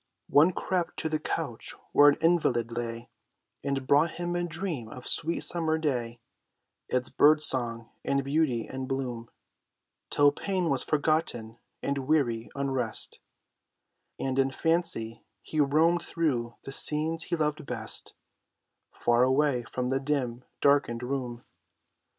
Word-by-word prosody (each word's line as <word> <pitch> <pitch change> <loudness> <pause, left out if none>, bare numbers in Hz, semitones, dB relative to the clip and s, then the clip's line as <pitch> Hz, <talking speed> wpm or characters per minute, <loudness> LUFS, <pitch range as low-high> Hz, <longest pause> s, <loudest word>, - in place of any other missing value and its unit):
One 155 +5 +6
crept 180 -1 -2
to 160 - -1
the 155 0 -1
couch - - -4 0.2
where 145 0 +7
an 145 - +1
invalid 135 -9 +2
lay, 115 0 -5 0.5
And 135 -1 -2
brought 145 +5 +3
him 175 0 -3
a 175 - 0
dream 165 - -4
of 125 - -10
the - - 0
sweet 165 +2 +3
summer 160 -2 +1
day, 120 -7 -2 0.7
Its 125 0 -1
bird 150 +1 +5
song 115 -4 0
and 140 0 0
beauty 140 -5 0
and 130 0 -6
bloom; 125 -4 -4 0.8
Till 145 0 +4
pain 185 +2 -2
was 135 - +2
forgotten 145 -7 -1 0.2
and 140 0 -1
weary 120 -7 +1
unrest, 135 -4 -1 1.0
And 135 0 -1
in 135 0 +3
fancy 160 -6 -1 0.2
he 155 - -4
roamed 160 +4 +3
through 125 -10 -1
the 135 - -7
scenes 160 +4 +1
he - - -1
loved 150 -2 -2
best, - - -5 0.8
Far 120 0 +2
away 130 0 +3
from 125 +1 -3
the 135 +1 +1
dim, 130 -4 -2 0.2
darkened 140 -4 +2
room. 125 -2 -4
140 Hz, 140 wpm, -28 LUFS, 120-155 Hz, 1.0 s, where